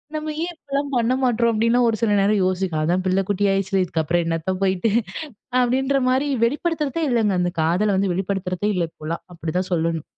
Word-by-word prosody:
நம்ம 310 0 -3
ஏன் 350 0 -4
இப்பல்லாம் 280 0 -3
பண்ணமாட்றோம்? 240 -1 +2
அப்பிடின்னு 230 +3 +3
ஒரு 220 - -1
சில 225 -2 +2
நேரம் 205 0 +2
யோசிக் 185 -3 -1
அதான் 175 +4 +1
பிள்ள 185 +1 +2
குட்டி 205 0 +1
ஆயிருச்சில்ல. 195 0 +1
இதுக்கு 165 -2 -1
அப்புறம் 170 +3 +1
என்னத்த 165 +3 -1
போயிட்டு 190 +3 +1 0.7
அப்பிடின்றமாரி 260 +2 +1 0.2
வெளிப்படுத்துறதே 300 +3 -1
இல்லங்க. 220 -4 +2
அந்த 175 0 0
காதல 185 +6 +2
வந்து 195 -1 +1
வெளிப்படுத்துறதே 190 +1 -2
இல்ல, 175 -2 +1
இப்போல்லாம். 160 +2 -6
அப்பிடி 165 -1 -5
தான் 185 0 -4
சொல்லணும். 165 -2 -1
200 Hz, 170 wpm, -22 LUFS, 180-250 Hz, 0.7 s, அப்பிடின்னு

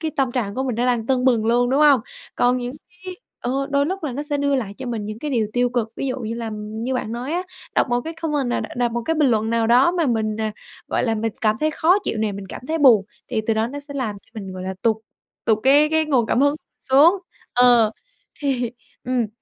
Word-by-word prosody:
cái 320 -1 -2
tâm 265 -3 +1
trạng 215 -6 -2
của 260 - -1
mình 255 -4 -2
nó 245 +2 +1
đang 235 -2 0
tưng 260 -1 +1
bừng 230 -4 +3
luôn, 245 +2 +3
đúng 280 +3 +2
hông? 285 -4 +6 0.3
Còn 245 +1 +3
những 245 +2 -4 0.3
cái, 370 -1 -6 0.2
ờ, 270 +3 -1
đôi 280 +1 +2
lúc 380 0 -3
là 275 - -2
nó 285 - -3
sẽ 295 -1 -2
đưa 280 0 +1
lại 215 -7 -2
cho 260 - -6
mình 220 -4 -3
những 215 +1 -6
cái 295 +2 -4
điều 225 -5 +1
tiêu 245 0 +2
cực, 240 -3 -1
ví 275 - -3
dụ 255 0 -2
như 225 0 -3
là 230 -1 -4
như 220 +4 -4
bạn 230 -3 -3
nói 250 +5 -4
á, 355 +2 0 0.3
đọc - - +3
một 245 - +2
cái 325 +6 -6
comment 290 -6 0
à, - - 0 0.2
đọc 240 -1 +1
một 235 0 -2
cái 325 - 0
bình 300 -4 +3
luận 220 -1 +1
nào 230 -1 +1
đó 250 +7 +5
mà 340 -4 +1
mình, 220 -2 0
à, 215 -1 -1 0.4
gọi - - 0
là, 225 -2 +1
mình 225 0 -2
cảm 215 -2 +2
thấy 310 0 +2
khó 340 +5 +3
chịu 220 - -2
này 215 -1 0
mình 195 0 -7
cảm - - -8
thấy 320 - 0
buồn, 240 -9 +6 0.2
thì 225 -3 0
từ 225 - +2
đó 220 +1 +1
nó 285 +4 -6
sẽ 285 0 -11
làm 235 -7 -2
cho 225 - -29
mình, 190 -1 -7
gọi 185 0 -7
là, 190 0 -4
tụt 225 -2 +3 0.5
tụt 220 -1 +3
cái 285 +3 +5
cái 315 0 +2
nguồn 265 -7 +2
cảm 245 - +1
hứng 285 +1 +4 0.3
xuống. 290 +7 +5 0.4
Ờ, 245 -3 +5 0.5
thì, 250 -5 0 0.3
ừm, 250 -2 0
245 Hz, 265 wpm, -22 LUFS, 225-280 Hz, 0.5 s, hông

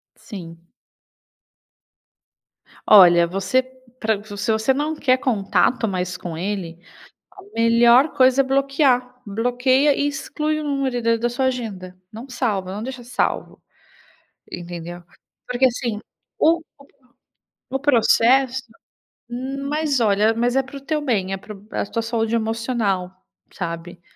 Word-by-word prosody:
Sim. 170 -4 -11 2.2
Olha, 175 -4 +8
você 195 +8 +1 0.4
Pra 215 -2 -1
se 205 +2 -6
você 220 +4 +2
não 300 +3 -1
quer 260 -3 +2
contato 235 -1 +1
mais 185 -1 -3
com 170 -3 -6
ele, 180 -3 -4 0.5
a 390 0 -15
melhor 235 +4 +5
coisa 260 -1 +4
é 275 - +4
bloquear, 270 -2 +1
bloqueia 250 +6 +2
e 285 - 0
exclui 300 +2 -3
o 305 - -4
número 275 -4 -1
da 230 0 +2
da 235 +1 -1
sua 260 +2 -2
agenda, 200 -8 -4 0.2
não 230 +5 -9
salva, 210 -7 -2
não 210 - -5
deixa 255 -1 -7
salvo. 250 +1 -2 0.9
Entendeu? 175 0 -7 0.5
Porque, 250 +1 +2
assim, 235 -4 -2 0.4
o 330 +1 +4 0.2
o 280 - -17 0.9
o 270 - -1
processo, 260 0 +3 0.7
hum, 270 +3 -5
mas 295 -3 0
olha, 215 0 +3
mas 240 +3 0
é 270 - +4
para 275 +2 -11
o 275 - -7
teu 305 +2 -2
bem, 210 -9 -1
é - - -1
pra 210 +3 -10 0.2
a - - -2
tua 230 - -3
saúde 225 0 -1
emocional, 225 -5 -1 0.4
sabe? 170 -1 -6
235 Hz, 135 wpm, -21 LUFS, 200-265 Hz, 2.2 s, Olha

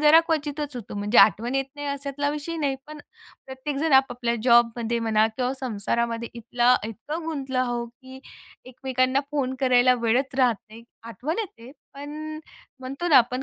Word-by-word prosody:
जरा 305 +2 +7
क्वचितच 295 -3 -2
होतो 230 -4 -8
म्हणजे 210 +3 +2
आठवण 230 +4 +5
येत 270 0 +1
नाही 290 0 -5
अशातला 280 +1 -2
विषय 300 +3 -4
नाही. 285 -4 -1
पण 305 0 -9 0.5
प्रत्येकजण 275 +3 -3
आपापल्या 245 -3 +3
जॉबमध्ये 235 -1 +3
म्हणा 220 -1 +2
किंवा 255 0 0
संसारामध्ये 235 0 -2
इथला 240 +2 +2
इतकं 295 +9 -6
गुंतलो 275 -5 -3
आहो, 240 -1 0
की 260 +2 -14 0.4
एकमेकांना 255 +1 0
फोन 270 -3 -1
करायला 255 -1 +5
वेळच 255 +4 +1
राहत 245 -4 +4
नाही. 225 +2 -12 0.2
आठवण 255 - -4
येते, 260 - -6 0.2
पण 305 +2 -7 0.4
म्हणतो 275 +7 -4
ना 295 - +6
आपण 250 +1 +3
260 Hz, 150 wpm, -25 LUFS, 235-290 Hz, 0.5 s, जरा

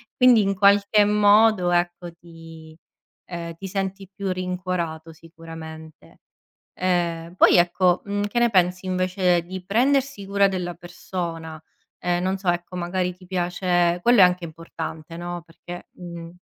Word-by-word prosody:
quindi, 250 -3 +6
in 195 0 +1
qualche 200 +1 +4
modo, 210 -2 +4
ecco, 175 0 -1
ti 165 -1 -14 0.5
ehm, 170 -1 -6
ti 195 +3 -8
senti 195 0 -4
più 200 -1 -3
rincuorato, 180 -3 -4
sicuramente. 160 -1 -12 0.6
Ehm, 175 -2 -1
poi, - - +6
ecco, 175 +1 +3
mhmm, 205 0 -2
che 225 +4 -1
ne 240 0 +4
pensi, 180 -1 +1
invece, 185 -1 +1
di 185 +1 -8
prendersi 255 +2 +1
cura 200 0 +3
della 180 -2 -3
persona? 170 -2 -6 0.4
Ehm, 175 0 0
non 190 +1 0
so, 185 -2 -1
ecco, 175 +1 -2
magari, 180 +1 -2
ti 180 0 -18
piace 175 -1 0
quello 240 0 +4
è - - +10
anche 180 -1 +2
importante, 160 0 -8
no, 175 0 -6
perché 175 +2 -11
mh. 170 -2 -9
180 Hz, 140 wpm, -23 LUFS, 170-195 Hz, 0.6 s, è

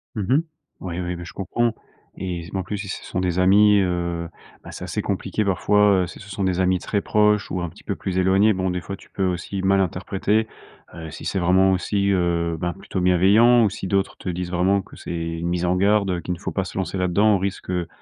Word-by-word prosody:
Mmh 105 - -2
mh. 135 - +3 0.4
Ouais, 90 -1 -4
oui, 90 0 -3
beh 85 - -7
je - - -10
comprends 115 +4 -1 0.4
et 90 -2 -4
s 85 - -11
b 95 - -3
en 95 - -2
plus, 105 +3 -4
si 100 0 -6
ce - - -6
sont 90 - -3
des 90 0 0
amis, 100 +2 +5
heu, 85 -2 -1 0.4
ben, - - -8
c'est - - -8
assez - - -3
compliqué 110 - -2
parfois, 100 0 +3
heu, - - -3
si - - -11
ce 100 - -12
sont 100 0 -3
des 95 -1 0
amis 90 -1 +2
très 100 +2 -1
proches 105 -1 +2
ou 90 0 -2
un 85 - -3
petit - - -18
peu - - -2
plus 95 -1 -4
éloignés. 95 +3 +4
Bon, 95 -1 -1
des 90 -1 -2
fois, 100 +4 -6
tu - - -18
peux 95 - -3
aussi 90 +2 -3
mal 95 +1 +3
interpréter, 95 +4 0 0.5
heu, 80 -2 -8
si - - -10
c'est 95 - -1
vraiment 95 +2 +4
aussi, 100 +2 0
heu, 85 -3 0
ben 85 -1 -2
plutôt 95 - -5
bienveillant 100 +7 +5
ou 105 - +3
si 95 0 -6
d'autres 100 +1 0
te - - -10
disent 90 0 -3
vraiment 95 +3 +2
que - - -15
c'est - - -7
une 85 0 -3
mise 85 0 -1
en 90 +1 +1
garde, 100 0 +3
heu, 90 - -1
qu'il 90 +2 -3
ne 85 - -8
faut - - -4
pas 95 -2 -2
se - - -8
lancer 95 0 -2
là-dedans, 100 +4 +3
au - - +2
risque, 95 0 -4
heu, 90 -2 -1
95 Hz, 255 wpm, -22 LUFS, 90-100 Hz, 0.5 s, amis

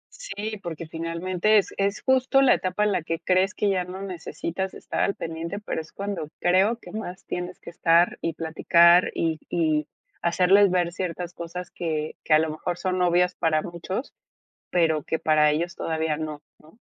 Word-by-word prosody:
Sí, 220 - -5
porque 165 -2 -6
finalmente 170 +5 0
es 200 - +1
es 200 +1 0
justo 260 +1 +3
la 255 - +6
etapa 185 +3 -1
en 210 - +2
la 185 - 0
que 165 +1 -3
crees 185 +3 +1
que 205 - +1
ya 185 -2 +1
no 185 +2 -8
necesitas 185 0 -4
estar - - -5
al 200 - +1
pendiente, 165 +3 -5
pero 205 -5 -3
es 160 - -15
cuando 195 -6 -4
creo 190 +6 +3
que - - -12
más 195 -4 -6
tienes 180 +1 -5
que - - -10
estar 170 +1 +3
y 165 - -1
platicar, 170 +2 +4
y 160 -1 0
y 155 -3 +1 0.3
hacerles 185 +4 +4
ver 175 -1 +1
ciertas 180 -1 -4
cosas 175 +1 -7
que 155 -3 -3
que 155 - +2
a - - +6
lo 160 0 0
mejor 170 +3 -4
son 185 0 -1
obvias 180 0 +3
para 155 -1 +1
muchos, 180 +8 -5 0.6
pero 160 -4 +2
que 160 - -2
para 150 -1 +4
ellos 170 +3 -2
todavía 160 -1 -1
no, 155 -1 -5 0.2
¿no? 160 +8 -21
175 Hz, 185 wpm, -25 LUFS, 160-190 Hz, 0.6 s, la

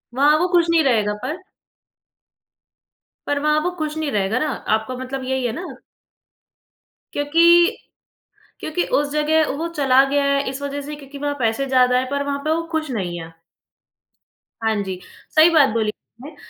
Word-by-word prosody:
वहाँ 295 +3 +4
वो 355 - +1
खुश 345 -1 +5
नहीं 330 -1 +4
रहेगा 215 -6 +2
पर 335 +4 -4 1.9
पर 290 0 0
वहाँ 300 +1 +2
वो 360 - -1
खुश 310 -1 -3
नहीं 310 -2 -2
रहेगा 205 +3 0
ना, 310 - 0
आपका 220 -3 -2
मतलब 260 +1 -5
यही 260 0 -2
है 240 - 0
ना? 355 +6 -6 1.5
क्योंकि 340 +6 +4 0.8
क्योंकि 315 +3 -2 0.2
उस 290 0 -2
जगह 305 +1 +2
वो 330 +2 -2
चला 275 -5 +3
गया 285 0 +1
है, 280 0 +1
इस 270 +1 -6
वजह 285 0 -4
से 295 +1 -7
क्योंकि 285 -1 -11
वहाँ 290 0 -2
पैसे 230 +3 0
ज़्यादा 250 -1 +3
हैं, 255 +1 -1
पर 280 0 -1
वहाँ 280 0 -3
पे 310 - -2
वो 330 +1 0
खुश 310 -3 -2
नहीं 180 -7 -3
है। 165 0 -10 1.3
हाँ 220 0 +1
जी, 185 -1 -5 0.4
सही 315 +2 +7
बात 305 -5 +5
बोली 220 -2 0
आपने। 260 +7 -12
285 Hz, 170 wpm, -21 LUFS, 255-310 Hz, 1.9 s, सही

